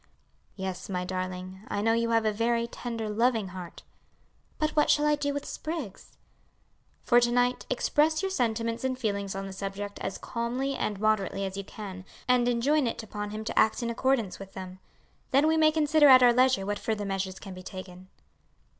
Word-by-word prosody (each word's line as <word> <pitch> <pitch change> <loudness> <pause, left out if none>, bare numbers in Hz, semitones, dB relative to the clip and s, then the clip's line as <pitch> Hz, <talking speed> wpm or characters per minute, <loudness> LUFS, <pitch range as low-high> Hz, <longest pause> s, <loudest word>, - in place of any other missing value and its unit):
"Yes, 190 -1 -5
my 180 -1 -2
darling, 185 0 -5
I - - -2
know 225 +1 +3
you 230 0 +1
have 225 -1 +2
a 215 - +2
very 230 +2 +1
tender, 230 -1 -5
loving 220 -1 +1
heart." 180 -2 -9 0.7
"But 310 0 0
what 300 -1 +2
shall 295 0 +4
I 300 - +4
do 290 -1 0
with 285 0 -4
Spriggs?" 310 - -6 0.9
"For 240 - +5
to 240 0 +2
night, 245 +1 +1
express 310 +6 +2
your 385 - -1
sentiments 230 -5 -1
and 260 -1 -1
feelings 200 -5 -2
on 195 0 -4
the 195 - -7
subject 200 +1 -5
as - - -4
calmly 245 +4 -2
and 210 -6 -2
moderately 200 -2 +1
as 190 0 -5
you 200 - -4
can, 190 -2 -8 0.2
and 250 -1 +3
enjoin 255 +4 +2
it 230 - -3
upon 210 -1 -5
him 215 +1 -5
to 220 - -1
act 220 +3 +3
in 235 - -1
accordance 235 -5 0
with 195 -1 -10
them. 185 0 -8 0.5
Then 275 +3 +4
we 320 +1 +3
may 310 -1 +5
consider 305 -1 +4
at 255 -2 +9
our 240 -1 +7
leisure 255 -5 +3
what 205 0 -2
further 215 -2 -2
measures 195 -1 -3
can 195 -3 -9
be 185 - -9
taken." 185 0 -9
225 Hz, 195 wpm, -28 LUFS, 195-255 Hz, 0.9 s, at